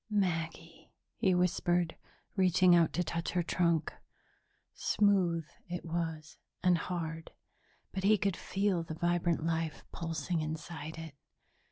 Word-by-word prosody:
"Maggie," 165 -4 -2 0.2
he 190 -5 +2
whispered, 175 -1 +1 0.4
reaching 185 -2 +5
out 170 -2 +4
to 180 - +1
touch 170 0 -3
her 175 -1 +2
trunk 170 -2 +1 0.8
smooth 185 -6 +2 0.2
it 175 0 -4
was, 160 -2 -3 0.2
and 180 -1 +5
hard, 165 -1 -4 0.6
but 190 - -4
he 210 +2 +5
could 195 -2 0
feel 195 -3 0
the 160 -1 -6
vibrant 175 -1 +1
life 165 -1 -2
pulsing 165 0 -2
inside 155 0 -5
it. 160 -2 -7
170 Hz, 125 wpm, -32 LUFS, 165-180 Hz, 0.8 s, reaching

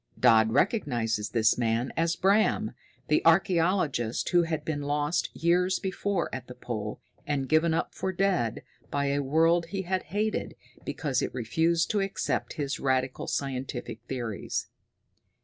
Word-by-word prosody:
Dodd 110 -3 +5
recognizes 120 - +1
this 115 0 +2
man 115 +2 0
as 165 +1 +1
Bram, 215 +3 +2 0.4
the 150 - +2
archaeologist 165 - +2
who 175 -1 +4
had 160 -3 -2
been 150 -2 -2
lost 145 +3 0
years 180 +3 +2
before 195 -1 -1
at 130 -1 -5
the 125 - -9
Pole 110 -4 -5 0.3
and 140 -2 -1
given 155 +2 +3
up - - -2
for 190 - -2
dead 185 - 0 0.3
by 140 0 0
a 140 - +1
world 165 +4 +3
he 190 +2 -3
had 185 +1 -1
hated 210 +4 -1 0.3
because 135 -5 -1
it - - -2
refused 165 +8 +1
to 210 - +1
accept 195 0 -2
his 145 -3 -3
radical 130 -1 0
scientific 130 -4 -3
theories. 120 -5 -3
150 Hz, 145 wpm, -28 LUFS, 125-175 Hz, 0.4 s, Dodd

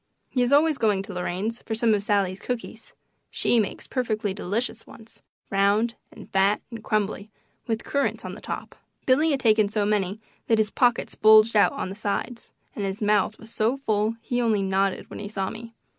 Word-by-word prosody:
He 255 - 0
is 245 +1 +1
always 300 0 +4
going 205 -3 +2
to 200 0 -8
Lorraine's 185 +6 -3
for 220 - -4
some 225 0 +3
of 205 - +1
Sallie's 200 -2 0
cookies 230 -2 -6 0.4
she 240 - +2
makes 210 - -2
perfectly 215 -5 -2
delicious 205 +5 -3
ones, 225 0 -11 0.3
round 200 +4 +2 0.2
and - - -12
fat 195 +2 +2
and 225 -2 -8
crumbly, 210 -1 -1 0.4
with 225 -1 -2
currants 280 0 -1
on - - -5
the - - -10
top. - - -6 0.3
Billy 290 +5 +4
had 280 -3 +1
taken 215 -3 +4
so 210 -1 0
many 205 -1 0 0.3
that 225 - +3
his 215 -1 +1
pockets 240 -2 +1
bulged 215 +1 +6
out 205 - +5
on 275 -9 -4
the 195 - -7
sides, 215 +3 -4 0.2
and 205 - -3
his 195 +1 -3
mouth 210 0 +1
was 225 0 -11
so 225 +5 +1
full 215 -4 0
he 245 0 -1
only 220 -4 +2
nodded 195 0 0
when - - -7
he 205 - -6
saw 195 -2 -3
me. 230 0 -10
215 Hz, 195 wpm, -25 LUFS, 200-230 Hz, 0.4 s, bulged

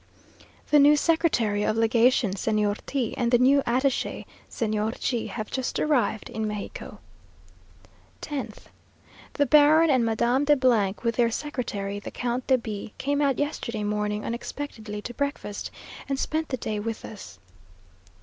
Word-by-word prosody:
The 300 - +7
new 295 +1 +6
Secretary 285 -11 +2
of 215 +1 0
Legation, 230 0 +3
Señor 210 0 0
T, 260 -5 -2
and 240 -2 +1
the 245 - +5
new 270 +3 +4
attache, 260 +2 0 0.2
Señor 215 0 -2
G, 240 -4 -1
have 215 -3 -6
just 260 -2 -2
arrived 245 -8 +1
in 220 0 -2
Mexico. 210 -1 -6 1.3
10th. 260 -8 -5 0.7
The 285 - +2
Baron 305 +3 +6
and 255 -3 +3
Madame 235 +4 +1
de, 295 0 +4 0.5
with 230 -1 0
their 235 -1 +4
secretary, 220 -7 -4
the - - -7
Count 245 0 -3
de 260 - +5
B, 215 -3 -6
came 285 +1 0
out 275 -3 +2
yesterday 235 -7 -3
morning 210 0 -2
unexpectedly 225 -4 -5
to 240 - -6
breakfast, 280 -7 -3 0.4
and 275 - 0
spent 315 +3 -2
the 255 - -2
day 215 -3 -3
with 225 +1 -4
us. 200 - -10
235 Hz, 145 wpm, -26 LUFS, 215-280 Hz, 1.3 s, The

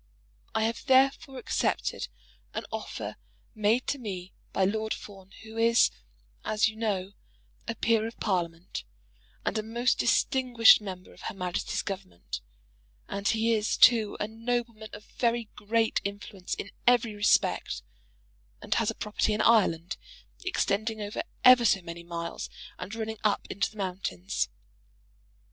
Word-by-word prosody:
I 220 - +2
have 225 +1 -1
therefore 265 0 +4
accepted - - -1 0.5
an - - -3
offer - - -5 0.4
made 220 +3 +2
to 285 - -1
me 190 -5 -6 0.2
by 190 - +2
Lord 220 +2 0
Fawn, 195 -2 -12
who 220 +1 -7
is, 230 +1 +5 0.5
as 215 0 +2
you 220 - -4
know, 200 -4 -1 0.6
a 230 - -2
peer 225 -1 +2
of 230 - -10
Parliament, 175 -4 -2 0.6
and 220 - 0
a - - 0
most 235 +3 0
distinguished 250 -6 +5
member 185 -3 -8
of - - -16
Her 220 - -5
Majesty's 180 -2 -2
Government; 185 - -6 0.7
and 200 0 -3
he 225 +1 +3
is, 215 -1 +1
too, 225 -4 +6
a 210 - -1
nobleman 230 -1 -3
of 210 0 -9
very 235 -2 -1
great 225 +2 +1
influence 200 -2 -5
in 200 - -6 0.2
every 240 -3 +4
respect, 205 0 +2 0.8
and - - -1
has - - +2
a - - -2
property 210 0 0
in - - 0
Ireland, 185 -7 +3 0.5
extending 220 - 0
over 205 0 -3 0.2
ever 255 -1 +9
so 195 -4 +3
many 170 0 -7
miles, 170 0 -5 0.3
and 185 +4 -6
running 220 -1 -4
up 210 -2 +2
into 195 - 0
the 215 - -17
mountains. 180 - -2
215 Hz, 145 wpm, -29 LUFS, 195-230 Hz, 0.8 s, ever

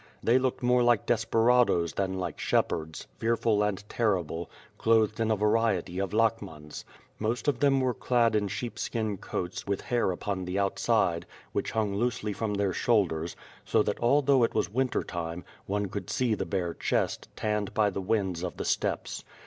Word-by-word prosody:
They 120 +3 +4
looked 130 0 -1
more 125 0 +4
like 120 -3 +3
desperados 115 - +3
than 95 -1 -1
like 90 -4 -4
shepherds, 80 -1 -1
fearful 115 -2 +2
and 105 0 -1
terrible, 90 -8 -1 0.3
clothed 110 -1 +3
in 115 -1 +1
a 110 - +3
variety 105 -4 +1
of 100 -1 -1
lakhmans. 105 -9 -1 0.4
Most 115 +6 -2
of 145 - +2
them 140 -2 +4
were 130 -1 +1
clad 120 -2 +2
in 105 -1 +1
sheepskin 110 -1 -3
coats, 90 +1 -5
with 100 -1 -1
hair 120 -5 0
upon 95 +1 -3
the 90 +2 -3
outside, 100 -3 +1 0.2
which - - -2
hung 110 -3 0
loosely 105 -1 -1
from 105 0 -2
their 100 -2 0
shoul 110 +1 +3
ders, 80 0 -5 0.3
so 110 - +2
that 105 - -2
although 135 +1 +4
it 115 - 0
was 90 - 0
winter 130 +1 +1
time, 85 0 -5 0.2
one 100 +1 0
could 100 +1 -5
see 125 -3 +1
the - - -2
bare 90 -4 -1
chest, - - -1
tanned 105 -2 -1
by 105 -2 +3
the 95 - -3
winds 95 -3 0
of 90 -1 -4
the - - -3
steppes. - - -1
105 Hz, 175 wpm, -28 LUFS, 95-115 Hz, 0.4 s, They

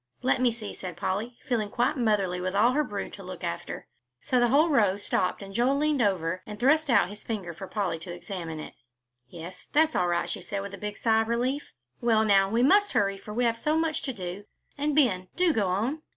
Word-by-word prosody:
"Let 255 0 +2
me 250 -2 +4
see," 220 -3 -6
said 180 -3 -7
Polly, 215 +7 -2
feeling 225 -5 0
quite 240 +7 +1
motherly 205 -7 +1
with 185 +1 -2
all 225 +5 +5
her 300 +3 +2
brood 205 -7 -5
to 195 - -9
look 185 -1 -8
after. 85 - -4 0.3
So 255 - +1
the 240 - +4
whole 295 +7 +4
row 210 -9 +3
stopped 200 -1 -1
and 195 0 -10
Joel 250 +6 +2
leaned 300 -2 +1
over 185 -4 0
and 210 0 -7
thrust 300 +5 +3
out 235 -7 +4
his 205 +1 -10
finger 195 -7 -4
for 190 +4 -8
Polly 190 -6 -2
to 175 +2 -8
examine 175 -3 -6
it. - - -8 0.5
"Yes, 170 +4 -9
that's 315 +1 +3
all 180 - +2
right," 175 0 0
she - - -4
said 195 +3 -4
with 200 0 -7
a 210 +1 -5
sigh 225 0 +2
of 225 - -2
relief. 250 +5 -1 0.3
"Well, 225 -2 +3
now, 195 -2 +4
we 230 +4 +2
must 405 +9 +4
hurry, 195 -1 +1
for 210 - -10
we 240 +4 0
have 230 -1 +1
so 305 +5 +1
much 320 -1 0
to 270 - -3
do. 190 -1 -6 0.3
And, 290 0 -1
Ben, 195 -11 +3
do 360 -3 +3
go 205 -6 +1
on." 225 +12 -1
210 Hz, 230 wpm, -27 LUFS, 185-255 Hz, 0.5 s, all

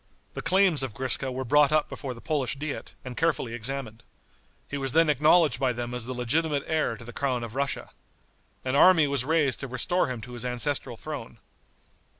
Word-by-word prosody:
The - - -5
claims 185 -3 +3
of 130 -5 -4
Griska 130 0 +2
were 130 +1 -4
brought 145 +2 +4
up 155 -1 +2
before 130 -3 -6
the 115 - -12
Polish 140 -5 -1
diet 145 +1 -6
and 125 -1 -6
carefully 155 -7 0
examined. 120 -1 -5 0.7
He 140 - -4
was 135 -2 -2
then 165 -1 +5
acknowledged 150 -1 +4
by 130 -2 +1
them 120 0 -5
as 125 -1 -4
the 130 - -4
legitimate 145 +4 0
heir 155 -8 0
to 115 - -12
the 120 - -9
crown 125 -2 -1
of 115 -1 -7
Russia. 140 +1 -2 0.7
An 130 +1 0
army 165 +1 +6
was 140 -3 0
raised 150 -2 +1
to 140 - -5
restore 125 +8 0
him 125 -3 -4
to 125 - -10
his 120 -1 -4
ancestral 125 0 -2
throne. 140 -6 -7
135 Hz, 195 wpm, -27 LUFS, 125-150 Hz, 0.7 s, army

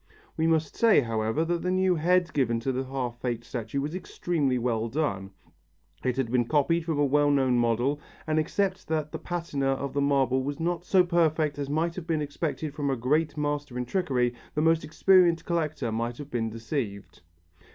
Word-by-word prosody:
We 160 - +1
must 160 -1 +1
say, 225 -9 +5
however, 115 +5 -1
that 170 0 -1
the 180 - -1
new 185 0 +3
head 175 +1 +2
given 120 -5 +1
to 135 - -1
the 130 +1 -2
half 125 -3 -4
faked 120 -2 -3
statue 120 +4 -3
was 150 +3 -3
extremely 165 -7 -1
well 115 -2 -1
done. 110 -9 -2 0.7
It 125 -1 0
had 125 -4 -1
been 125 -1 +2
copied 160 +4 +2
from 160 -3 -1
a 145 - +3
well 145 +1 +3
known 130 -3 +3
model 120 +5 +1 0.3
and 155 0 +1
except 190 +4 -1
that 155 -1 -1
the - - -5
patina 170 -6 -2
of 140 0 -4
the 140 - 0
marble 135 -2 +2
was 145 +3 -4
not 170 +1 -1
so 185 -1 +5
perfect 160 -4 +1
as 140 -1 -3
might 160 +3 0
have 175 -3 -7
been 160 -2 +1
expected 150 0 -3
from 145 -2 -2
a 135 - +1
great 150 +6 0
master 145 -3 -2
in 125 - -2
trickery, 125 -7 0 0.2
the 150 - +1
most 165 0 +3
experienced 175 +1 +4
collector 155 -8 -1
might 115 +2 -2
have 145 -1 -9
been 115 -2 -1
deceived. 110 - -5
145 Hz, 195 wpm, -27 LUFS, 125-165 Hz, 0.7 s, say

